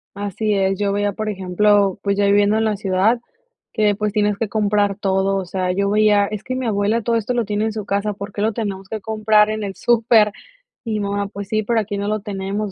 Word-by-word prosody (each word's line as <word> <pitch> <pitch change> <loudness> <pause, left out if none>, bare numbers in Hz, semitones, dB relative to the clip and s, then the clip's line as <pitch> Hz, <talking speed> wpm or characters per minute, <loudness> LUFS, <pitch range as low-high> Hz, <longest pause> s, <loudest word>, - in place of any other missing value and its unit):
Así 205 +1 -2
es. 195 0 +1
Yo 200 -1 +1
veía, 205 0 0
por 215 +2 -3
ejemplo, 200 +1 +2
pues 200 0 -1
ya 205 - +2
viviendo 205 +1 +3
en 220 - +1
la 215 -1 +1
ciudad, 195 +4 +1 0.5
que, 210 -3 +2
pues 210 0 -1
tienes 210 -1 +1
que 220 -2 -2
comprar 205 -2 +1
todo. 195 -1 0
O 190 - -3
sea, 185 0 -2
yo 200 +2 0
veía 210 -1 +4
es 210 0 -6
que 255 - -4
mi 255 0 -3
abuela 215 +1 +1
todo 235 +1 +1
esto 230 +2 -1
lo 235 -3 0
tiene 210 +1 -1
en 220 - -2
su 215 -2 -5
casa, 200 +1 -1
¿por 200 0 -8
qué 205 - -4
lo 220 +2 +2
tenemos 195 -3 -4
que 220 -1 -4
comprar 215 0 +2
en 215 0 -3
el 195 -1 -5
súper? 230 -2 +3 0.5
Y 225 - -3
mi 215 - -1
mamá: 200 0 -2
"Pues 200 0 -8
sí, 215 0 0
pero 230 +2 +1
aquí 205 -1 -3
no 200 +1 -3
lo 215 -1 -1
tenemos, 200 +1 -4
205 Hz, 245 wpm, -20 LUFS, 200-215 Hz, 0.5 s, veía